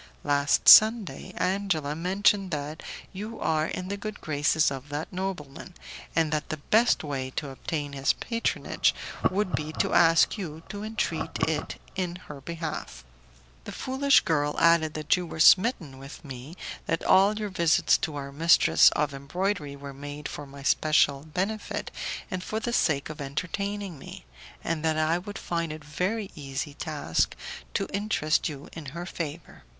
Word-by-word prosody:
Last 145 0 +2
Sunday, 220 -1 +7
Angela 180 -7 0
mentioned 195 +3 +2
that 150 -1 -4 0.3
you 215 +4 -6
are 155 0 +1
in 185 - -5
the 200 +1 -3
good 215 +1 -6
graces 155 0 +2
of 135 +1 -7
that 150 +5 -5
nobleman, 180 -3 -5 0.4
and 160 -2 +2
that 150 -1 -2
the 155 - -3
best 220 +10 +3
way 135 -3 -3
to 145 -3 -3
obtain 145 +1 -4
his 135 0 +2
patronage 230 -1 0 0.3
would 190 0 -1
be 155 0 -2
to - - 0
ask 165 +5 +5
you 160 -4 -6
to 205 -1 -6
entreat 220 +1 -2
it - - -2 0.2
in 180 -2 -2
her 150 -6 -10
behalf. 160 - -6 0.6
The - - -6
foolish 270 +1 +3
girl 150 -3 0
added 165 -2 +4
that 155 +2 +2
you 180 -1 -4
were 160 - -8
smitten 175 - +4
with 135 +4 -11
me, 135 +4 -8 0.3
that 165 - -1
all 200 +3 +5
your 210 -1 -3
visits 170 -3 +3
to 155 - -3
our 140 -1 -5
mistress 165 +4 +6
of 145 -1 0
embroidery 150 +2 -2
were 140 0 -9
made 145 +1 -7
for 145 - -7
my 140 0 -11
special 145 -1 +3
benefit 200 +6 -3 0.4
and 185 -1 -3
for 215 - -3
the 235 +2 -3
sake 150 -8 +1
of 155 -1 -9
entertaining 185 +5 -4
me, - - -10 0.4
and 165 -2 -2
that 160 -1 +1
I 160 +2 +2
would 205 +3 -8
find 170 -5 -2
it 155 0 -8
a - - -17
very 190 +7 -2
easy 140 0 -5
task 145 - -1 0.4
to - - +1
interest 200 -8 +1
you 145 -1 -8
in 160 -4 -8
her 175 - -4
favour. 165 -2 -6
160 Hz, 165 wpm, -27 LUFS, 145-190 Hz, 0.6 s, Sunday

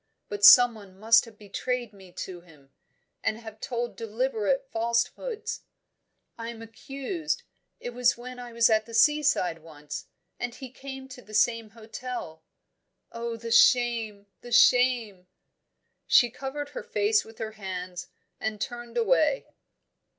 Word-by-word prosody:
But 205 0 -5
someone 215 -5 +7
must 225 +3 +5
have 225 -2 -15
betrayed 235 +3 -4
me 190 -2 -15
to 180 -2 -7
him, 150 -6 -20 0.5
and 215 - 0
have 220 -1 -11
told 240 -2 -3
deliberate 235 +3 -1
falsehoods. 235 - -2 0.8
I 230 0 -5
am 225 -1 -8
accused 275 - -4 0.4
it 245 - -6
was 245 0 +2
when 250 +1 -9
I 245 -1 -8
was 230 0 +4
at 220 0 +2
the 230 - -7
seaside 280 - +3
once 150 -2 -9 0.3
and 245 -1 -4
he 260 -3 -9
came 265 0 -9
to 255 -1 -10
the 215 -2 -10
same 230 0 +2
hotel 225 -6 -7 0.7
Oh, 235 0 -4
the 230 0 -7
shame, 230 -4 +4 0.2
the 240 - -11
shame!" 235 -6 +4 0.8
She 240 -2 +5
covered 280 +3 -5
her - - -6
face 420 +1 +1
with 225 0 -15
her 220 -1 -4
hands, 185 -3 -6 0.3
and 220 -1 -3
turned 240 0 -6
away. - - +2
230 Hz, 140 wpm, -27 LUFS, 215-250 Hz, 0.8 s, someone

